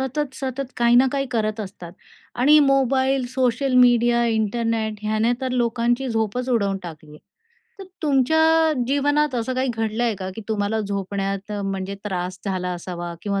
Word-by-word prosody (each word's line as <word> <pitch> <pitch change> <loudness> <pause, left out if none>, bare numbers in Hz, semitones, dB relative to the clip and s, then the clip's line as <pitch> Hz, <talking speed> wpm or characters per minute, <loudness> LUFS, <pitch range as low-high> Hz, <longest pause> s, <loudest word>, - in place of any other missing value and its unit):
सतत, 265 +1 -3
सतत 265 0 -5
काही 235 0 +3
ना 260 +2 +6
काही 275 -1 -1
करत 215 -2 -1
असतात 185 -4 -8 0.5
आणि 295 +5 +6
मोबाईल, 270 -1 +2
सोशल 255 +1 0
मीडिया, 240 -1 +4
इंटरनेट 220 0 -1
ह्याने 215 +2 +1
तर 260 -1 -2
लोकांची 240 +1 0
झोपच 225 +2 -1
उडवून 200 -6 +1
टाकली 155 -3 -10
आहे. 150 - -13 0.6
तर - - -7 0.2
तुमच्या 320 +3 +3
जीवनात 290 +1 +1
असं 245 +2 -2
काही 260 +1 0
घडलं 225 +1 -2
आहे 230 -2 +1
का, 185 -1 -5
की - - -5
तुम्हाला 215 0 -1
झोपण्यात 195 0 -3
म्हणजे 195 0 -3
त्रास 185 -2 -3
झाला 185 -2 -2
असावा 175 -1 -6
किंवा 200 -1 -1
235 Hz, 155 wpm, -22 LUFS, 200-260 Hz, 0.6 s, ना